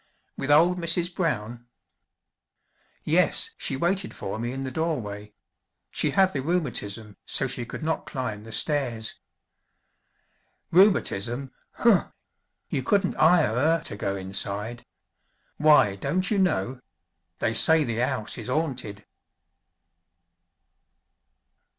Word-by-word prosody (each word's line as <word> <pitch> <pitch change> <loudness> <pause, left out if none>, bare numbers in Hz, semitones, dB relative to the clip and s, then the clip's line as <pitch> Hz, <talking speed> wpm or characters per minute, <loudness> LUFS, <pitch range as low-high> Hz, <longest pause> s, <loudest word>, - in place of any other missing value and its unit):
"With 135 - -5
old 170 +5 +4
Mrs. 170 +1 +2
Brown?" 120 - -3 1.4
"Yes, - - +2
she - - -3
waited 185 +6 -1
for 95 +3 -5
me 120 +1 -3
in 135 +1 -5
the 130 - -5
doorway 105 -10 -4 0.6
she - - 0
had 190 -1 +2
the 135 - -2
rheumatism 115 - -2
so - - +2
she 125 -2 -2
could - - -7
not 160 +1 -2
climb 125 -6 -5
the 115 - -11
stairs." 120 -3 0 1.5
"Rheumatism? 135 - +2 0.2
Huh! - - +2 0.5
you - - -2
couldn't 195 +7 +1
'ire 160 -8 +4
'er 160 +6 +2
to - - 0
go 100 -1 -3
inside. 100 +4 -3 0.7
Why, 150 -10 +4
don't 180 - -1
you 205 - +1
know? 130 - 0 0.6
They 110 - -1
say 160 +7 +6
the 115 -3 -2
'ouse 125 -3 -2
is 115 - -4
'aunted!" 125 -9 -3
130 Hz, 115 wpm, -25 LUFS, 110-165 Hz, 1.5 s, say